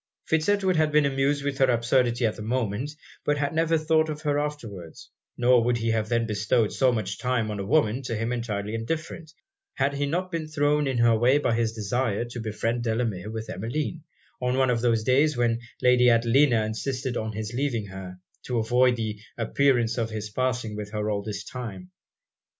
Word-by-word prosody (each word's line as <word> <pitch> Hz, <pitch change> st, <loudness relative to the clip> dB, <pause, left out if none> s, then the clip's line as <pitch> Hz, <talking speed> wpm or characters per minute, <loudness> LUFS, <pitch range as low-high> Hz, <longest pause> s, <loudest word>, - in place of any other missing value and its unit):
Fitz 160 Hz, +3 st, +1 dB
Edward 195 Hz, -3 st, +2 dB
had 155 Hz, -1 st, +2 dB
been 150 Hz, -1 st, +4 dB
amused 140 Hz, +1 st, +1 dB
with 140 Hz, 0 st, -2 dB
her 135 Hz, -1 st, +4 dB
absurdity 120 Hz, 0 st, +2 dB
at 110 Hz, -, 0 dB
the -, -, -9 dB
moment, 120 Hz, +4 st, -2 dB, 0.3 s
but 145 Hz, 0 st, +1 dB
had 140 Hz, +1 st, -1 dB
never 165 Hz, 0 st, +2 dB
thought 155 Hz, 0 st, +2 dB
of 155 Hz, 0 st, -5 dB
her 145 Hz, -1 st, +1 dB
afterwards; 115 Hz, -, -6 dB, 0.3 s
nor 120 Hz, -1 st, +4 dB
would 120 Hz, 0 st, +1 dB
he 115 Hz, 0 st, 0 dB
then 110 Hz, +1 st, +1 dB
have -, -, -1 dB
bestowed 105 Hz, +1 st, +1 dB
so 130 Hz, -2 st, +3 dB
much 100 Hz, -4 st, -3 dB
time 120 Hz, -4 st, 0 dB
on 105 Hz, -, -4 dB
a -, -, -2 dB
woman 120 Hz, +1 st, +2 dB
to 120 Hz, -3 st, -4 dB
him 115 Hz, +3 st, -1 dB
entirely 105 Hz, -3 st, -3 dB
indifferent, 155 Hz, +7 st, -4 dB, 0.4 s
had 140 Hz, -, +1 dB, 0.2 s
not 180 Hz, +4 st, -2 dB
he 165 Hz, -, 0 dB
been 155 Hz, -, -6 dB
thrown 150 Hz, -1 st, +1 dB
in 130 Hz, -2 st, -1 dB
her 115 Hz, -1 st, +4 dB
way 120 Hz, +5 st, +4 dB
by 145 Hz, -5 st, +1 dB
his 115 Hz, -1 st, 0 dB
desire 115 Hz, +1 st, -1 dB
to 120 Hz, 0 st, -7 dB
befriend 115 Hz, +2 st, -2 dB
Delamere 110 Hz, -4 st, -1 dB
with 110 Hz, 0 st, -5 dB
Emmeline, 150 Hz, -, -3 dB, 0.4 s
on 125 Hz, +1 st, 0 dB
one 130 Hz, -1 st, +3 dB
of 115 Hz, -2 st, 0 dB
those 115 Hz, -2 st, +2 dB
days 135 Hz, +4 st, +3 dB
when 115 Hz, -1 st, +1 dB, 0.2 s
Lady 125 Hz, 0 st, +5 dB
Adelina 115 Hz, 0 st, +4 dB
insisted 125 Hz, +3 st, -3 dB
on 110 Hz, -1 st, -3 dB
his 110 Hz, +1 st, -5 dB
leaving 125 Hz, -4 st, -1 dB
her, 95 Hz, -2 st, -8 dB, 0.3 s
to 125 Hz, -, -2 dB
avoid 125 Hz, +2 st, +3 dB
the 110 Hz, -3 st, -4 dB, 0.2 s
appearance 120 Hz, 0 st, +2 dB
of 115 Hz, -1 st, -1 dB
his 105 Hz, -1 st, -5 dB
passing 125 Hz, -2 st, -1 dB
with 105 Hz, -1 st, -5 dB
her 105 Hz, 0 st, -1 dB
all 100 Hz, -1 st, -2 dB
his 105 Hz, 0 st, -5 dB
time. 100 Hz, -8 st, -7 dB
120 Hz, 200 wpm, -26 LUFS, 110-140 Hz, 0.4 s, Lady